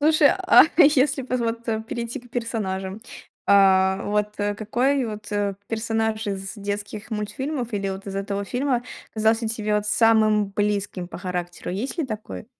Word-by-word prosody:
Слушай, 305 -1 +5 0.2
а - - +9
если 285 -3 +5
поз 255 -1 -2
вот, 230 0 -2
э, 220 -1 0
перейти 235 +1 -5
к 245 -1 -19
персонажам, 200 -4 -3 0.5
а, 190 -1 +5
вот, 210 0 -1
э, 205 0 0
какой 245 +6 +1
вот, 210 -1 -7
э, 205 -1 0
персонаж 220 -1 -1
из 195 0 -4
детских 205 +1 -5
мультфильмов 245 +4 -3
или 200 -1 -1
вот 195 +1 -6
из 195 - -5
этого 200 0 -2
фильма 250 +2 0 0.3
казался 220 +1 +2
тебе 215 -1 -1
вот 210 0 0
самым 215 -2 +3
близким 200 -3 -1
по - - -8
характеру, 180 -1 -4
есть 230 - -4
ли 325 - +1
такой? 215 -2 -6
215 Hz, 160 wpm, -24 LUFS, 200-235 Hz, 0.5 s, а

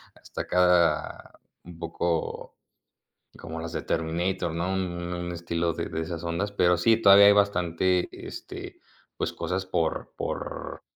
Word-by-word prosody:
hasta - - -7
acá 90 -3 +1 0.3
un 85 -1 -12
poco 85 0 -3 0.8
como 80 +1 -7
las 85 0 -6
de - - -3
Terminator, 85 +2 -1
¿no?, 85 +3 -1
un, 95 - 0 0.3
u - - -2
un 85 - -4
un 90 - -4
estilo 85 0 -1
de - - -4
de 80 - -4
esas 80 0 -5
ondas, 85 +4 -2
pero 90 -3 +3
sí, 110 +6 +4
todavía 100 0 +9
hay 100 - +8
bastante, 90 -2 +2
este, - - -9 0.4
pues - - -2
cosas 90 +3 -3
por 85 -3 -2
por - - -5
85 Hz, 155 wpm, -27 LUFS, 85-95 Hz, 0.8 s, todavía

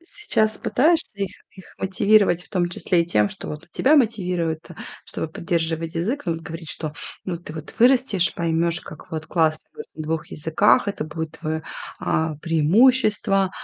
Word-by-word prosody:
Сейчас 340 - -1
пытаешься 320 -2 +1
их 195 -1 -2 0.2
их 190 -2 -15
мотивировать, 195 -2 +3
в - - -15
том 175 -2 0
числе 175 0 +1
и 170 - -7
тем, 105 -10 +2
что - - -8
вот 150 +3 -7
и - - -30
тебя 280 - +3
мотивировать-то, 180 - 0 0.3
чтобы - - -4
поддерживать 165 0 -2
язык, 225 +13 -1
ну, 170 - 0
вот 165 - -8
говорить, 165 -1 -7
что: 155 -2 -5 0.3
"Ну, 185 - -3
вот 170 +1 -9
ты - - -7
вот 155 -1 -8
вырастешь, 240 -8 +4
поймёшь, 170 0 +1
как 155 - -12
вот 155 -1 -5
классно 160 -2 0
говорить - - -10
на 155 - -5
2 160 +1 -2
языках. 160 +9 +2
Это 200 -6 -2
будет 160 +1 -5
твоё, 160 -1 -3 0.4
а, 160 -1 -1
преимущество, 195 - +3
170 Hz, 175 wpm, -23 LUFS, 160-205 Hz, 0.4 s, вырастешь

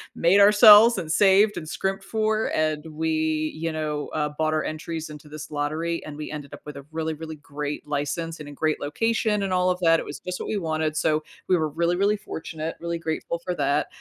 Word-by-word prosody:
made 175 +4 +4
ourselves 210 +2 +8
and 165 -4 -3
saved 200 +3 +4
and 155 - -6
scrimped 190 +4 -2
for, 220 0 0
and 155 0 0
we, 155 0 -1
you 165 +1 -3
know, 150 -2 -3
uh, 150 -1 0
bought 155 0 +1
our 155 - 0
entries 160 +1 -5
into 150 0 -11
this 155 +1 -8
lottery 155 +3 -2
and 150 - -8
we 155 - -6
ended 145 -2 -7
up - - -10
with 150 -1 -8
a 140 - -10
really, 160 0 -2
really 160 +1 -7
great 145 0 -6
license 150 +3 -3
and 150 - -8
a - - -8
great 155 +1 -1
location 215 +7 0
and 195 - -2
all 180 0 +2
of 180 0 0
that, 165 -1 +4
it - - -6
was 145 - -7
just 180 0 -5
what - - -5
we 215 - -1
wanted, 160 -3 -1
so 155 0 +1 0.3
we 185 - +5
were 160 -2 0
really, 170 +3 0
really 200 +2 +2
fortunate; 160 -5 -6
really 170 0 -3
grateful 165 +1 -3
for 180 +1 -3
that. 145 -1 +1
160 Hz, 225 wpm, -24 LUFS, 155-180 Hz, 0.3 s, ourselves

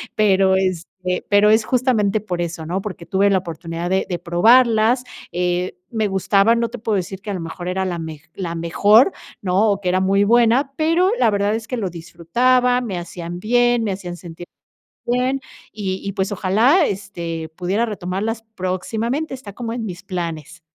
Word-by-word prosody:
pero, 195 -3 +4
este 185 0 -2
pero 205 +1 +5
es 220 +1 +4
justamente 230 -5 +1
por 180 -4 -3
eso, 170 -1 -4
¿no? 180 +4 -2
Porque 185 -4 -7
tuve 195 +3 +2
la 195 - +3
oportunidad 165 0 -5
de 190 +1 +1
de 175 -2 -2
probarlas, 225 +7 +4 0.3
eh, 180 +1 -1
me 220 -2 0
gustaban, 200 +3 +3
no 235 - +1
te 245 - -7
puedo 220 -1 -1
decir 190 +1 -5
que 205 - -5
a - - -2
lo 185 - -3
mejor 165 +2 -6
era 190 +1 -1
la 175 -2 -3
mej 160 -2 -7
la 175 -3 -4
mejor, 205 - +4 0.3
¿no?, 200 +3 +2
o 200 - -1
que 185 - -4
era 185 +1 +2
muy 195 +1 +3
buena, 240 +5 +3
pero 330 +5 +2
la - - +4
verdad 205 0 +1
es 220 -1 -5
que 250 - -3
lo 200 -5 -2
disfrutaba, 245 +10 +1
me 210 -7 -4
hacían 175 0 -7
bien, 240 +3 +2
me 205 - -1
hacían 180 -2 -7
sentir 175 0 -10 0.6
bien. 250 +3 0 0.3
Y 190 -3 -3
y, - - -2
pues, 190 +1 -2
ojalá, 225 - +3
este, 170 -5 -5
pudiera 190 +6 0
retomarlas 210 +2 -3
próximamente, 225 - -2
está 250 -6 -9
como 230 +2 -5
en 235 -2 -4
mis 185 -1 -7
planes. 170 -3 -5
195 Hz, 185 wpm, -20 LUFS, 180-225 Hz, 0.6 s, pero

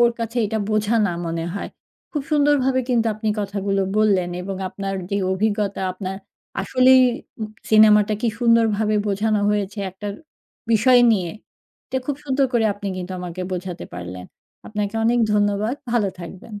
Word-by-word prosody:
ওর 240 0 +6
কাছে 230 +1 -4
এটা 220 +2 -2
বোঝা 215 +1 +1
না 175 - -1
মনে 165 0 -2
হয়। 200 - -4 0.4
খুব 295 - -2
সুন্দরভাবে 285 -3 +3
কিন্তু 235 -2 +2
আপনি 215 +1 -3
কথাগুলো 200 -1 -1 0.2
বললেন 200 -4 +3
এবং 195 +1 -5
আপনার 195 +1 -4 0.2
যে 200 - 0 0.2
অভিজ্ঞতা, 205 0 -1
আপনার 190 +1 -5 0.4
আসলেই 260 0 +5 0.4
উ - - -2 0.3
সিনেমাটা 215 -1 +6
কী 235 - +1
সুন্দরভাবে 225 -3 +3
বোঝানো 210 +1 +1
হয়েছে 205 0 -2
একটা 190 +3 -9 0.7
বিষয় 245 +3 +5
নিয়ে। 180 -5 0 0.6
এটা 260 - -2
খুব 290 - -1
সুন্দর 275 -1 +1
করে 235 -2 +2
আপনি 205 0 -8
কিন্তু 185 0 -5
আমাকে 180 0 -6
বোঝাতে 180 -1 -5
পারলেন। 90 +1 -7 0.4
আপনাকে 210 0 -3
অনেক 240 +2 +3
ধন্যবাদ। 205 +3 +1 0.2
ভালো 225 -5 +2
থাকবেন। 195 +5 -9
210 Hz, 150 wpm, -22 LUFS, 195-230 Hz, 0.7 s, ওর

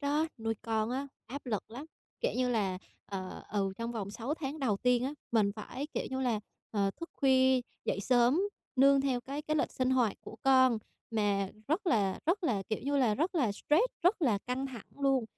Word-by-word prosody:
đó, 295 +2 +1
nuôi 225 0 -1
con 220 0 0
á, 270 +3 -2 0.2
áp 280 +3 -7
lực 215 -5 -1
lắm. 255 +6 -7 0.4
Kiểu - - +1
như 255 0 +2
là, 195 -6 0 0.3
ờ, 190 -2 -6
ừ, 195 -2 0
trong 230 +2 -3
vòng 205 -4 -4
6 235 +7 -3
tháng 300 -1 -4
đầu 245 -8 +1
tiên 250 +2 +2
á, 275 - -1 0.2
mình 210 -3 +3
phải, 255 +6 -5
kiểu - - -1
như 260 0 -2
là, 240 -5 +1 0.3
ờ, 200 -2 +1
thức 335 - -7
khuya 260 -1 +4 0.2
dậy 200 - 0
sớm 245 - +4 0.4
nương 275 +1 +6
theo 265 -3 0
cái 275 +4 -5
cái 305 +1 0
lịch - - +1
sinh 255 0 0
hoạt 245 -6 +2
của - - -10
con. 260 -3 +5 0.3
Mà 205 -3 +1 0.2
rất 345 +6 0
là 200 - +2
rất 365 +4 +1
là, 210 -9 +1
kiểu 215 - -1
như 285 +1 0
là, 245 -6 +3
rất 330 - 0
là 255 - +2
stress, 300 - +3 0.2
rất 360 +2 +3
là 230 -8 +3
căng 255 +2 -1
thẳng 245 -6 -9
luôn. 270 -3 +2
255 Hz, 210 wpm, -32 LUFS, 220-280 Hz, 0.4 s, nương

